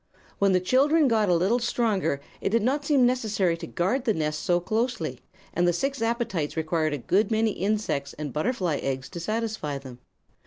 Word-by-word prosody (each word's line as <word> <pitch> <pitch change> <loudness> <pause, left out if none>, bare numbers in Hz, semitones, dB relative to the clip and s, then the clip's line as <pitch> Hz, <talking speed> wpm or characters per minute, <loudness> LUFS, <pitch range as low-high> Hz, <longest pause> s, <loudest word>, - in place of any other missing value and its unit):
"When 200 -1 +4
the 185 - +4
children 280 - +3
got 220 -4 +2
a 175 - +4
little 190 +8 +2
stronger 220 - 0 0.2
it - - 0
did 225 +1 +2
not 280 +5 +1
seem 280 -4 +4
necessary 215 -8 +1
to - - -7
guard 235 +10 -1
the 220 -4 +2
nest 155 -1 -1
so 175 -2 +2
closely, 215 - -2 0.3
and 175 0 +2
the 175 - +3
six 270 +7 -2
appetites 225 - -1
required 160 -1 0
a - - -1
good 190 - +1
many 220 -1 +2
insects 200 -8 -1
and 150 -3 -6
butterfly 175 - 0
eggs 130 -1 -3
to 175 - -7
satisfy 215 -6 -2
them. 130 -3 -10
200 Hz, 190 wpm, -26 LUFS, 160-235 Hz, 0.3 s, When